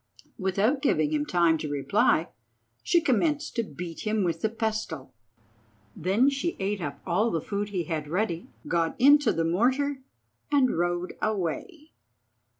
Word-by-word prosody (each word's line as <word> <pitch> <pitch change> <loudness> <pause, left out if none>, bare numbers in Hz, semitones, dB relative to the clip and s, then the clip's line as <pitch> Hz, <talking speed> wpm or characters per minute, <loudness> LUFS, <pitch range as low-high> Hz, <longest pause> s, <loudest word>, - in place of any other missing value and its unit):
Without 200 +8 +1
giving 295 +1 +2
him 300 -1 0
time 170 -2 +3
to 150 - -4
reply 145 +3 +2 0.5
she 345 -1 +3
commenced 300 +3 0
to 235 - +2
beat 170 -2 -7
him 215 -1 0
with 165 -2 -1
the 220 - +1
pestle. 220 - -3 0.8
Then 195 - +2
she 280 +5 0
ate 200 0 -2
up 145 -3 -5
all 200 +6 +1
the 165 - -1
food 200 +5 -3
he 185 -4 -2
had 160 -3 -3
ready, 175 0 -2 0.2
got 165 +2 0
into 285 -1 +6
the 165 - 0
mortar, 260 +11 +1 0.5
and 275 -3 +3
rode 175 +1 -1
away. 220 - -3
205 Hz, 150 wpm, -27 LUFS, 170-265 Hz, 0.8 s, into